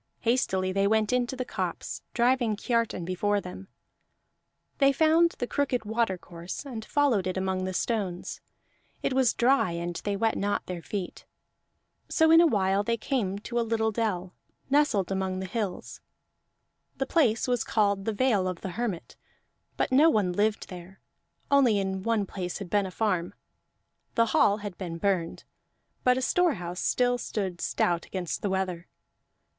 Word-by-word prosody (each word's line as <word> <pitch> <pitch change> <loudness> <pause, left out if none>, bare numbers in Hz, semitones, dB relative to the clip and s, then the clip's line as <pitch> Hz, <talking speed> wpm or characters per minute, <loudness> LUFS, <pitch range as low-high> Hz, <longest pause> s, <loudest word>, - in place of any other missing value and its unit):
Hastily 190 -6 +1
they 195 +1 +2
went 215 +1 +2
into 250 +1 0
the 255 0 -3
copse, - - -4
driving 240 -2 +2
Kiartan 230 -5 -1
before 205 +3 0
them; 190 0 -9 1.1
they 275 -1 +6
found 320 +4 +3
the - - -1
crooked 255 -4 -1
watercourse 190 -3 -3
and 235 -5 -6
followed 235 -7 +1
it 185 - -2
among 190 0 -1
the 185 - -2
stones; 195 -7 -2 0.6
it - - 0
was 260 -3 +3
dry 245 -7 +3
and 170 0 -4
they 205 -1 -2
wet 225 +2 +1
not 205 0 -1
their 180 -2 -5
feet. 190 0 -6 0.8
So 320 -1 +4
in 330 +1 +8
a 340 - +6
while 195 -6 +2
they 230 +2 0
came 215 -5 -1
to 240 0 -1
a - - +3
little 220 -1 0
dell, 195 -5 -2 0.4
nestled 275 -11 +2
among 190 -1 -1
the 190 - -4
hills; 195 -1 -4 1.0
the 270 - 0
place 260 -8 +2
was 245 -2 +1
called 200 -2 +1
the 225 - 0
Vale 210 -4 +2
of 180 -2 -4
the 190 - -4
Hermit. 200 -3 -4 0.6
But - - 0
no 290 +5 +6
one 200 - +1
lived 210 +3 0
there, 180 +1 -10 0.5
only 260 -7 +5
in 190 -1 -2
one 225 0 +1
place 180 -2 -5
had 195 -4 -8
been 205 -2 +2
a - - -8
farm; 185 -4 -1 0.8
the 230 - +4
hall 205 0 +4
had 195 -4 -7
been 170 -3 -5
burned, 175 -2 -1 0.6
but 250 0 +4
a 260 - -1
storehouse 190 - 0
still 245 0 +1
stood 190 -7 -3
stout 170 -1 0
against 180 -3 -4
the 205 - -1
weather. 185 -2 -2
205 Hz, 160 wpm, -27 LUFS, 185-240 Hz, 1.1 s, in